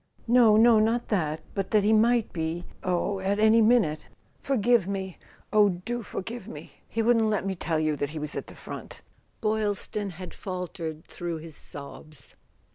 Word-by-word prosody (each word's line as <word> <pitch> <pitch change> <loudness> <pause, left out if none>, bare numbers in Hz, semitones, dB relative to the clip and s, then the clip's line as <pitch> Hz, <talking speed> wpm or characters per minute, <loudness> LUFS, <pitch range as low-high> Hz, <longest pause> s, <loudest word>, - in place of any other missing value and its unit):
"No, 230 -3 +6
no, 225 0 +6
not 230 +2 +1
that; 160 -7 0
but 195 -2 -2
that 210 -2 +3
he 215 +2 +4
might 230 +1 +3
be—oh, 175 +3 -2
at 195 +2 0
any 220 +2 +5
minute! 215 -10 +3 0.3
Forgive 240 -6 +2
me—oh, 200 +2 0
do 195 +7 -4
forgive 225 +1 -6
me! 235 - -9 0.2
He 225 - -1
wouldn't 230 -1 +4
let 210 -3 0
me 195 - -1
tell 165 -3 -1
you 155 -1 +1
that 145 - -2
he 155 - -7
was 150 0 -2
at - - -4
the - - -12
front," - - -9 0.4
Boy 220 0 +1
Is 205 -2 -1
ton 205 -1 -3
had 180 0 -9
faltered 180 -4 -6
through 170 -1 -5
his 160 -1 -10
sobs. 145 0 -10
200 Hz, 175 wpm, -27 LUFS, 170-220 Hz, 0.4 s, No